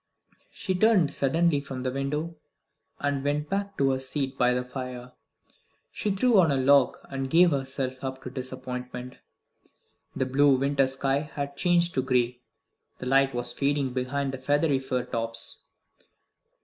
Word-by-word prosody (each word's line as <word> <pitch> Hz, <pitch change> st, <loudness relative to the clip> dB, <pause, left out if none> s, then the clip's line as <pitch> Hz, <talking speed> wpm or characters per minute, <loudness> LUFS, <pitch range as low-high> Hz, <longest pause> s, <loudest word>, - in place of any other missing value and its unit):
She 190 Hz, -, -3 dB
turned 185 Hz, -5 st, +3 dB
sullenly 150 Hz, +2 st, +2 dB
from 135 Hz, -2 st, -6 dB
the 130 Hz, -, -1 dB
window, 150 Hz, +5 st, -3 dB, 0.7 s
and 140 Hz, -1 st, -1 dB
went 145 Hz, +1 st, -1 dB
back 200 Hz, 0 st, -2 dB
to 135 Hz, -1 st, +3 dB
her 130 Hz, -, -1 dB
seat 135 Hz, 0 st, -3 dB
by 125 Hz, -1 st, +3 dB
the 125 Hz, 0 st, 0 dB
fire, 125 Hz, -1 st, -7 dB, 0.9 s
and 200 Hz, -2 st, 0 dB
threw 240 Hz, -4 st, +5 dB
on 170 Hz, -3 st, +5 dB
a -, -, +2 dB
log, 135 Hz, 0 st, +4 dB
and 135 Hz, -1 st, -3 dB
gave 170 Hz, +3 st, +5 dB
herself 135 Hz, -1 st, -3 dB
up 130 Hz, 0 st, -5 dB
to 125 Hz, -, -6 dB
disappointment. 125 Hz, -1 st, -6 dB, 1.0 s
The 130 Hz, -, 0 dB
blue 135 Hz, +1 st, +4 dB
winter 140 Hz, 0 st, +2 dB
sky 135 Hz, +1 st, 0 dB
had 145 Hz, -1 st, -5 dB
changed 175 Hz, +2 st, +2 dB
to 130 Hz, -, +1 dB
gray; 125 Hz, -1 st, 0 dB, 0.6 s
the -, -, -7 dB
light 135 Hz, 0 st, +3 dB
was 120 Hz, 0 st, -2 dB
fading 140 Hz, -1 st, 0 dB
behind 135 Hz, +2 st, -2 dB
the 135 Hz, -, -6 dB
feathery 145 Hz, +1 st, +2 dB
fir 130 Hz, -2 st, -2 dB
tops. 115 Hz, -1 st, -1 dB
135 Hz, 155 wpm, -27 LUFS, 130-145 Hz, 1.0 s, threw